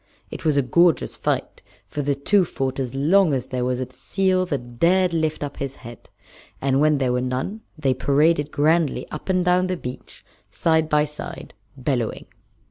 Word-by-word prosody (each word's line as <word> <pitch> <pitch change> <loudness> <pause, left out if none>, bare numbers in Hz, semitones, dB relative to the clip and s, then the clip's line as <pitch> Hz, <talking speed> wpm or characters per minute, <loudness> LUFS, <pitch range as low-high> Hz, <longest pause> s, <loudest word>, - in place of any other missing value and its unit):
It - - -7
was 155 -3 +2
a 140 - +3
gorgeous 170 +6 +3
fight, - - -2 0.3
for 145 - -4
the 140 0 0
two 190 +8 +3
fought 135 -5 -3
as 130 -1 -3
long 165 +4 +4
as 130 0 -4
there 125 -1 -2
was 125 0 -1
a 130 0 -5
seal 185 +5 0
that 120 -6 -5
dared 180 +1 +3
lift 155 -2 -1
up 145 -1 -6
his 135 -1 -4
head, 120 0 -11 0.5
and 135 0 +1
when 150 -1 +4
there 130 -2 +1
were 125 - 0
none 130 - -3 0.2
they 140 -4 +1
paraded 145 +3 +2
grandly 155 +1 +1
up 150 - -7
and 185 -1 +2
down 180 +1 +3
the 185 -1 -2
beach 125 -5 -9 0.2
side 160 -1 +1
by 150 -1 +3
side, 150 0 -8 0.2
bellowing. 125 -3 -2
145 Hz, 185 wpm, -23 LUFS, 130-170 Hz, 0.5 s, long